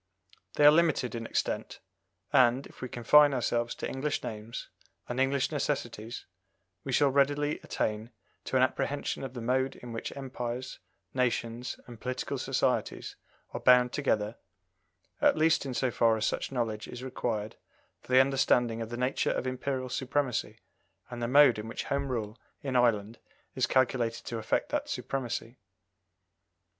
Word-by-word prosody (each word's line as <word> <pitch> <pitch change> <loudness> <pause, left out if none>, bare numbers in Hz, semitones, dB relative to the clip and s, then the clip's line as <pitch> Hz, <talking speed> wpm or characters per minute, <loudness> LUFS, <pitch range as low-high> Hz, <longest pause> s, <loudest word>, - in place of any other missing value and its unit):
They 145 - +4
are 145 - +11
limited 155 -7 +2
in 115 -1 -4
extent, - - -2 0.5
and, 130 0 +4
if - - -15
we 130 - -4
confine 145 +5 +5
ourselves 120 -1 0
to - - -4
English 140 +3 -2
names 110 +1 -6 0.4
and 125 +1 -3
English 135 +1 +1
necessities, 120 -6 -3 0.6
we - - -4
shall 145 -2 +4
readily 145 +2 +2
attain 110 +2 -2 0.4
to - - -3
an - - +5
apprehension - - -1
of 130 -1 -6
the 120 - -5
mode 130 +2 +1
in 120 -1 -9
which 115 - -4
empires, 125 -2 -5 0.3
nations, 120 -1 -1
and 120 -3 -12
political 125 0 -3
societies - - -1 0.4
are - - -3
bound 125 -1 +5
together, 110 -6 0 0.8
at - - +4
least 155 -2 +3
in 130 - -4
so 130 0 +1
far 115 -1 +3
as 110 - -1
such - - -2
knowledge 115 -4 -2
is 125 +1 -8
required 115 -4 -3 0.5
for - - -12
the 130 +1 +8
understanding 125 -4 +2
of 115 - -4
the 120 - -5
nature 125 +2 0
of - - -1
Imperial 130 0 -2
supremacy, 130 0 -1 0.5
and 120 0 -6
the 120 - 0
mode 130 -3 +6
in 105 - -6
which 115 - -4
Home 140 0 -1
Rule 110 -2 -4 0.2
in 135 -2 -3
Ireland 115 -2 +2 0.3
is - - +1
calculated 120 -3 +1
to 115 - -4
affect 110 - -1
that - - -2
supremacy. 120 -2 -4
125 Hz, 155 wpm, -29 LUFS, 115-135 Hz, 0.8 s, are